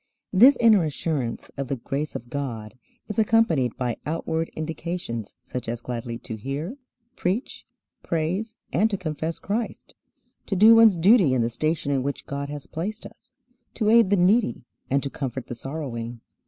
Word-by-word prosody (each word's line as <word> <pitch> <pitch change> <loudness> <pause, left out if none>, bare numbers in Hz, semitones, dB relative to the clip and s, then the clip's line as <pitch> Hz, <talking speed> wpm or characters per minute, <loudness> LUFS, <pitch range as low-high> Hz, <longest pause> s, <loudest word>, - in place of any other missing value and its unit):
This 245 +8 +7
inner 220 -6 +6
assurance 150 -5 -3
of 140 -1 -3
the 135 - -1
grace 140 +5 -4
of 120 +1 -7
God 115 -7 -4 0.3
is 210 +1 -3
accompanied 205 - +3
by 125 -3 -2
outward 160 +1 -2
indications 160 - -4
such 125 -2 -5
as 120 0 -3
gladly 120 -1 -5
to 110 -1 -7
hear, 140 - -4 0.4
preach, 195 +9 -2 0.3
praise, 180 +8 -2 0.2
and 220 - +3
to 200 - -1
confess 160 -2 -3
Christ, 220 +3 -4 0.5
to 195 - -1
do 215 +4 +8
one's 225 -3 +7
duty 180 - +5
in 120 - +2
the 115 - -1
station 155 +4 -1
in 135 -2 +1
which 140 +2 -4
God 140 0 -4
has 145 -1 -6
placed 205 +7 -5
us, 250 - -14 0.4
to 215 -2 +2
aid 230 -4 +6
the 200 - +3
needy, 185 - +3 0.3
and 140 +1 +1
to 140 - -2
comfort 130 -3 -4
the - - -6
sorrowing. 120 -3 -5
155 Hz, 165 wpm, -25 LUFS, 125-200 Hz, 0.5 s, do